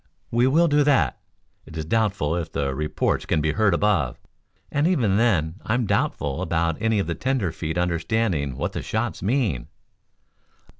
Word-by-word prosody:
"We 120 +2 +3
will 165 +6 +4
do 145 -1 +3
that. 135 - +2 0.5
It 80 - -9
is 80 - -3
doubtful 100 -5 0
if 85 -2 -3
the 70 -1 -1
reports 75 +2 -1
can 80 - +1
be 75 +1 +1
heard 105 -2 +2
above, 90 -11 +1 0.5
and 145 +3 +2
even 120 - +2
then 95 -6 +1
I 110 - 0
am 125 -2 0
doubtful 70 -7 -1
about 85 0 -1
any 110 -1 +2
of 100 - +1
the 85 - -2
tenderfeet 85 -8 -2
understanding 85 - 0
what - - -2
the - - -3
shots - - -2
mean. 105 - 0
95 Hz, 165 wpm, -24 LUFS, 80-115 Hz, 0.5 s, will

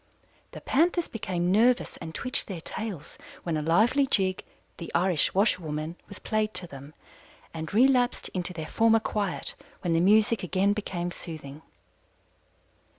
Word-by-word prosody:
The - - -8
Panthers 340 +4 +2
became 180 -5 -2
nervous 235 +5 +3
and 160 -1 -8
twitched 255 - 0
their 185 -4 -5
tails 190 -5 -6 0.2
when 170 -2 -1
a 155 - -1
lively 220 - +3
jig, 190 -7 +1 0.3
'The 170 - -7
Irish 180 -2 +2
Washerwoman,' 165 -6 0
was 200 - -9
played 215 -1 -1
to 180 - 0
them, 140 -1 -11 0.6
and 160 -1 -5
relapsed 245 +2 +3
into 180 0 -1
their 160 -3 -6
former 225 +5 +3
quiet 205 -4 -2 0.3
when 175 -2 0
the 165 - +3
music 215 +4 +4
again 190 +2 +1
became 175 -4 -3
soothing. 155 -4 -9
185 Hz, 145 wpm, -27 LUFS, 165-220 Hz, 0.6 s, music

